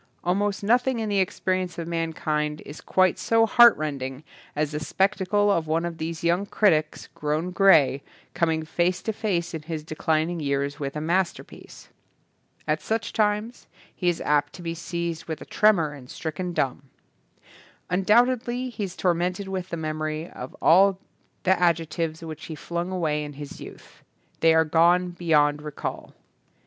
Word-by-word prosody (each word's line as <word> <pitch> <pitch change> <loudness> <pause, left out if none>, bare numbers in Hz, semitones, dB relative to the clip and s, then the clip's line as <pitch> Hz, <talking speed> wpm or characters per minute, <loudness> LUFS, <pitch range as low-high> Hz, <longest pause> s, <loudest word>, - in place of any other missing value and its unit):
Almost 200 +3 0
nothing 245 +4 +2
in 220 -1 -2
the 200 -1 +1
ex 185 - -1
perience 185 -2 -1
of 165 -1 -5
mankind 155 -2 -2
is 145 - -10
quite 185 -2 +2
so 225 0 +3
heart 235 +1 +7
rending 140 -2 -4 0.3
as 150 0 -1
the 150 - -3
spectacle 200 +4 +1
of 165 -5 0
one 165 +2 0
of 170 -1 -5
these 160 +1 -4
young 175 +4 +1
critics, 155 -9 +1
grown 155 +4 -2
grey, 160 -8 +5 0.3
com 170 -2 +1
ing 160 0 -1
face 175 +3 0
to 220 - -2
face 180 -6 -2
in 160 - -4
his 155 0 -5
declining 160 +2 -1
years 140 0 -2
with 140 -1 -4
a 150 - -3
masterpiece. 175 +3 -3 0.8
At - - 0
such 225 0 -2
times 210 +2 -1 0.3
he 180 - +1
is 175 - -1
apt 150 0 +1
to 180 - -10
be 165 -1 -3
seized 170 -1 -4
with 160 -1 -5
a - - -10
tremor 175 -9 +3
and 130 -3 -12
stricken 175 +3 -4
dumb. 135 -2 -2 1.0
Undoubtedly 240 +6 +2
he 210 -3 -3
is 185 -1 -8
tor 180 -2 +2
mented 180 +3 -2
with 185 -1 -4
the 170 - -4
memory 155 0 -3
of 125 - -9
all 190 +3 +6 0.5
the 185 - +3
ad 170 -2 +4
jectives 165 0 -4
which 155 -1 -8
he 160 - -6
flung 170 +3 -4
away 155 -5 -1
in 145 0 -7
his 145 0 -9
youth. - - -12 0.4
They 165 0 +5
are 160 0 +4
gone 175 +3 +3
beyond 150 -4 +2
recall. 150 -1 -6
170 Hz, 170 wpm, -25 LUFS, 155-190 Hz, 1.0 s, heart